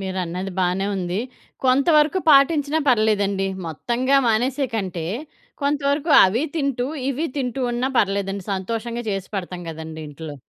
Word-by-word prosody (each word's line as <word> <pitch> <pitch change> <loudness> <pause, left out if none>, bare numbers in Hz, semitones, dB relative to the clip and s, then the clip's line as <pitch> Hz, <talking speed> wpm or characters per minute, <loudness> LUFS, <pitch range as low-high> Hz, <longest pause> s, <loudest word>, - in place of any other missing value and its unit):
మీరన్నది 185 0 -4
బానే 185 +2 +1
ఉంది. 180 +2 -2 0.4
కొంతవరకు 300 +6 +4
పాటించినా 290 +1 +4
పర్లేదండి. 205 -4 +2 0.2
మొత్తంగా 245 - 0
మానేసే 255 +5 +1
కంటే, 185 -6 -3 0.6
కొంతవరకు 285 +2 0
అవీ 225 +10 +1
తింటూ 275 -4 0 0.2
ఇవీ 285 +5 -1
తింటూ 260 -1 -2
ఉన్నా 245 +2 0
పర్లేదండి, 195 -1 0
సంతోషంగా 230 +5 -4
చేసి 195 -1 -3
పెడతాం 180 -2 -4
గదండీ 160 0 -7
ఇంట్లో. 150 0 -8
220 Hz, 120 wpm, -22 LUFS, 190-275 Hz, 0.6 s, కొంతవరకు